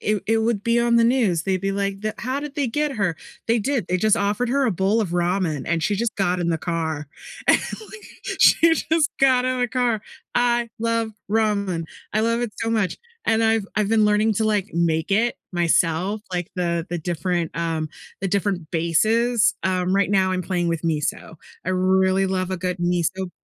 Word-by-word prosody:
it 210 -2 0
it 225 +1 +2
would 220 -2 0
be 235 0 +2
on 235 0 +2
the 235 - +5
news. 230 -9 +2
They'd 190 0 -1
be 195 +1 -1
like, 200 0 -2
"That 215 0 -2
how 255 +3 -2
did 295 -1 -7
they 285 -4 0
get 295 +5 -1
her? 200 -8 -1 0.3
They 230 - +3
did. 240 -2 -1
They 180 - +1
just 215 +4 +3
offered 205 +4 0
her 275 +2 +2
a 245 - +2
bowl 195 +4 +1
of 210 - -1
ramen 175 -4 0
and 165 -1 0
she 205 +4 +1
just 230 +2 -1
got 180 -2 +1
in 170 -1 0
the 165 - 0
car." 160 -3 -3 0.4
And - - +7
like 435 0 -8 0.3
she 330 0 +6
just 320 0 +1
got 260 -2 +4
in 255 0 0
the 245 - +2
car. 240 -3 0 0.4
I 240 -1 +2
love 230 0 0 0.2
ramen. 200 -6 0 0.3
I 215 - +2
love 230 +1 +1
it 240 -4 -3
so 225 - -1
much, 215 -5 0 0.3
and 225 0 +2
I've 225 -2 +2
I've 210 -2 +1
been 220 -1 +3
learning 210 +1 +3
to 220 - 0
like 210 -2 +1
make 165 0 0
it 225 +4 +2 0.2
myself, 175 +3 +1
like 180 -1 -2
the 170 -2 -1
the 175 - -3
different, 170 0 -2
um, 165 -2 -1 0.3
the 195 - -1
different 190 -4 -1
bases. 215 +8 +2
Um, 185 0 +1
right 200 0 +2
now 190 -2 +3
I'm 185 0 -1
playing 175 -1 -1
with 165 -2 -2
miso. 160 -1 -2 0.3
I 185 - +1
really 190 +1 +2
love 185 -1 -1
a - - -1
good 180 0 -3
miso 175 +1 -1
200 Hz, 205 wpm, -22 LUFS, 175-230 Hz, 0.4 s, And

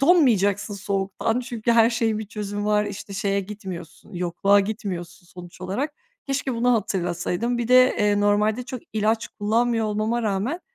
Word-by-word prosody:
donmayacaksın 220 - +3
soğuktan 200 +4 -1
çünkü 235 -2 -1
her 230 0 +5
şeyin 225 -2 0
bir 220 - -5
çözümü 205 -1 -4
var. 210 0 +2
İşte, 200 0 -7
şeye 200 0 0
gitmiyorsun, 190 -2 -9
yokluğa 180 +3 +3
gitmiyorsun 195 -4 -5
sonuç 175 0 -12
olarak. 255 +12 -3 0.3
Keşke 275 -2 -1
bunu 245 +2 +2
hatırlasaydım. 190 +2 -1
Bir 235 0 -2
de, 255 0 +6
eee, 205 0 +2
normalde 210 +3 +2
çok 255 -1 -7
ilaç 220 +1 0
kullanmıyor 225 +1 0
olmama 215 +3 -1
rağmen 220 - -1
210 Hz, 150 wpm, -24 LUFS, 195-235 Hz, 0.3 s, de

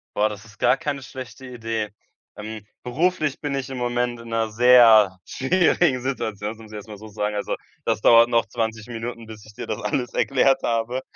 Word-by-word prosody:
Boah, 105 +1 +2
das 105 +1 -9
ist 105 -2 -18
gar 125 +2 +4
keine 145 -2 -3
schlechte 130 0 -9
Idee. 115 -3 -3 0.5
Ähm, 110 0 -7 0.2
beruflich 155 +3 0
bin 145 -2 -2
ich 135 0 -4
im 130 - -5
Moment 120 0 -1
in 115 - -11
'ner 115 -1 -1
sehr 115 -4 +6
schwierigen 160 -2 +2
Situation, 110 -5 -3
das 110 - -11
muss 110 -1 -13
ich - - -9
erst 105 +1 -8
mal 105 -2 -9
so 110 +2 -11
sagen. 105 0 -3
Also 105 - -2 0.3
das - - 0
dauert 115 +1 +7
noch 115 -1 +2
20 110 -2 -3
Minuten, 115 0 -6
bis 110 -2 -11
ich 110 - -15
dir - - -6
das 110 - -3
alles 125 +4 -2
erklärt 135 0 +2
habe. 120 +2 -1
115 Hz, 205 wpm, -23 LUFS, 110-130 Hz, 0.5 s, dauert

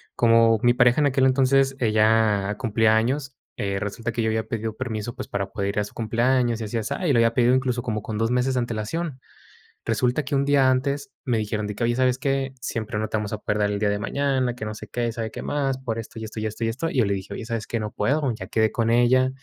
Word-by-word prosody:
como 115 -1 +5
mi 120 0 +5
pareja 125 +4 +4
en 145 - +4
aquel 135 0 +2
entonces, 135 +1 +3
ella 110 -2 +2
cumplía 110 -2 +2
años, 135 +4 0 0.2
eh, 100 -1 -2
resulta 115 +3 -4
que 115 - -1
yo 110 - +1
había 110 0 -1
pedido 110 -2 -3
permiso, 120 -1 -4
pues, 130 - -6
para 100 -1 -3
poder 100 -1 -2
ir 100 - -1
a - - +1
su 105 - -10
cumpleaños 120 +1 +1
y - - -2
así, 110 +2 -3
asá, 115 - -3
y, - - +3
lo - - +3
había 115 0 +3
pedido 120 +1 +3
incluso 125 -2 +1
como 110 -4 -2
con 105 0 -5
2 115 +2 0
meses 125 +1 +1
de 125 - +1
antelación. 125 +6 -3 0.7
Resulta 125 +5 0
que 140 - -1
un 135 - +2
día 140 -2 +4
antes 140 +2 -1
me 120 -4 0
dijeron 105 0 -2
de 105 - -4
que: 115 - -4
"Oye, 120 0 +1
¿sabes 130 0 +2
qué?, 135 -1 -1
siempre 110 -2 -4
no 110 - -1
te - - -3
vamos 105 -1 -2
a 110 - -2
poder 105 0 -2
dar 105 0 +1
el 100 - -2
día 105 - +1
de 100 0 -1
mañana, 130 +1 0
que 115 -3 -7
no 110 - -4
sé 110 0 -9
qué, 120 +2 -1
y - - -1
sabe 115 -2 -4
qué - - -7
más, 135 -2 -1
por 120 -4 -4
esto, 115 0 -7
y 110 - -5
esto, 110 0 -6
y 110 - -2
esto, 110 +2 -4
y - - +1
esto". 135 +9 -2
Y - - -4
yo 120 - +4
le 100 - 0
dije: 95 0 -5
"Oye, 115 - -6
¿sabes 115 -2 -4
qué?, 115 - -2
no 105 -1 -4
puedo, 135 +4 0
ya - - -8
quedé 110 -1 +2
con 115 -1 0
ella, 120 +2 +4
115 Hz, 275 wpm, -24 LUFS, 110-130 Hz, 0.7 s, como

